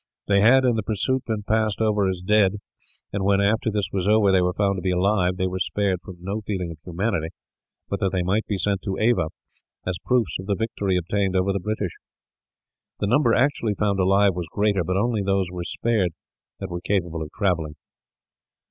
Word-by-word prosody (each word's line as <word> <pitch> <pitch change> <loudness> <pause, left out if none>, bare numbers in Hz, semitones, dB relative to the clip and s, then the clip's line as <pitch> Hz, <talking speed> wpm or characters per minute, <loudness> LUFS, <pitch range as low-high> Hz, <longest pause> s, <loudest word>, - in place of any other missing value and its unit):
They 100 -1 +3
had, 130 +5 +6
in 120 -2 +3
the - - +1
pursuit, 120 +5 -1
been 110 -2 -2
passed 110 -1 0
over 105 -3 +2
as 90 -1 -4
dead; 105 -1 +4 0.6
and 100 -1 -1
when, 100 0 +3
after 105 +3 +2
this 105 -2 -1
was 95 -1 -1
over, 105 -2 +4
they 95 -1 +4
were 90 0 +1
found 100 -1 +1
to - - -7
be 95 - -1
alive, 90 0 +1
they 95 - 0
were 95 0 -2
spared 95 -1 0
from 90 +2 -10
no 100 +4 -3
feeling 95 -5 -3
of 80 - -10
humanity, 90 -1 -1 0.6
but - - -3
that 95 - +1
they 95 -2 0
might 100 +5 0
be 100 - -1
sent 100 +1 0
to 95 -1 -3
Ava, 115 -7 +2 0.6
as 90 -1 -2
proofs 120 -11 +1
of 95 - -8
the 100 - +1
victory 100 -3 -1
obtained 95 +2 -1
over 95 +1 +2
the 100 - -1
British. 105 -1 -2 1.1
The - - 0
number 120 +2 +3
actually 125 -6 +1
found 100 -1 0
alive 95 +1 +4
was 85 -1 -4
greater, 100 +2 +1
but 95 +3 -1
only 110 +1 +1
those 95 -2 0
were 90 -1 -5
spared 95 -2 0 0.5
that 95 -2 -6
were 85 0 -4
capable 85 -5 -1
of 75 - -5
travelling. 85 -6 0
100 Hz, 205 wpm, -24 LUFS, 90-105 Hz, 1.1 s, had